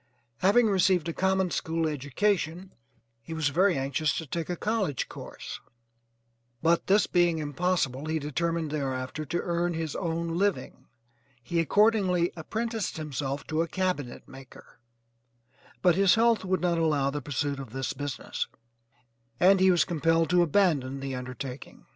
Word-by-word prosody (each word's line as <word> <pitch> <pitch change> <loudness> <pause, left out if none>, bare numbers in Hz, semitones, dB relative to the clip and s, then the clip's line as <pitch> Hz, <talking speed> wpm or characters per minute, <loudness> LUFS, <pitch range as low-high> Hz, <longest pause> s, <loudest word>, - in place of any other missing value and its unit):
Having 205 +6 +4
received 185 -4 +2
a - - -3
common 190 0 +1
school 165 0 -1
education 165 +5 -1 0.5
he 160 +8 -7
was 155 -3 +1
very 180 +4 +3
anxious 140 +3 0
to 160 - -4
take 165 +3 -4
a 180 - -1
college 200 - -1
course, - - -8 1.0
but 170 +1 +2
this 200 +2 +4
being 175 -2 +2
impossible, 150 -2 -1
he 160 0 0
determined 160 +1 -2
thereafter 135 0 -3
to 170 +5 -2
earn 175 0 -1
his 160 -2 -3
own 170 -1 -2
living. 200 -1 -1 0.6
He 170 +6 -1
accordingly 185 0 +3
apprenticed 220 +6 -3
himself 140 -2 -4
to 155 +1 0
a 170 - -1
cabinet 180 -9 -3
maker, 135 -1 -14 1.0
but 180 -1 +6
his 195 +1 +4
health 230 -1 +3
would 185 0 0
not 175 -2 +1
allow 145 -4 +1
the 145 +1 -4
pursuit 145 +1 -2
of 135 - -7
this 130 +3 -3
business, 145 0 -4 0.9
and 190 +2 +6
he 190 0 +5
was 175 -2 +4
compelled 165 -1 +1
to 180 0 +5
abandon 150 -6 +2
the 135 0 -4
undertaking. 130 +1 -7
165 Hz, 150 wpm, -28 LUFS, 145-185 Hz, 1.0 s, but